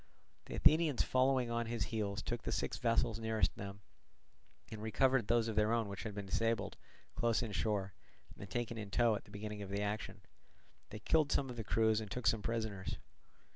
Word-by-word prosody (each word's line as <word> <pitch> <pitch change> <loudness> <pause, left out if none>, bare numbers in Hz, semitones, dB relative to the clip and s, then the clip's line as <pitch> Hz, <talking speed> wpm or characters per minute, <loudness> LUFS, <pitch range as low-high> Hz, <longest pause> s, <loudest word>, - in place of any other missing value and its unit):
The - - -6
Athenians 155 -4 +4
following 130 -2 +2
on 115 0 -1
his 115 -2 -1
heels 100 -2 -1
took 120 -1 -3
the - - -3
six - - -1
vessels 115 -1 +1
nearest 110 -1 +1
them, 100 0 -7 0.9
and 110 -1 -6
recovered 120 +2 +2
those 115 -1 +3
of 110 - -2
their 105 +1 +3
own 115 -2 +1
which 100 0 -6
had 110 -3 -5
been 100 -1 -4
disabled 115 +4 0 0.4
close 115 0 +1
inshore 105 -3 -1 0.4
and 100 - -9
taken 120 0 -2
in 105 -2 -6
tow 115 +3 +3
at 105 - -4
the - - -17
beginning 105 0 -5
of 100 - -6
the 100 +1 -1
action; 105 +1 -3 0.7
they - - -7
killed 155 +6 +2
some 135 -2 +1
of - - -7
the 115 - -4
crews 110 0 +2
and 105 - -6
took 125 +4 -5
some 110 - +3
prisoners. 110 -4 -3
110 Hz, 195 wpm, -36 LUFS, 105-120 Hz, 0.9 s, Athenians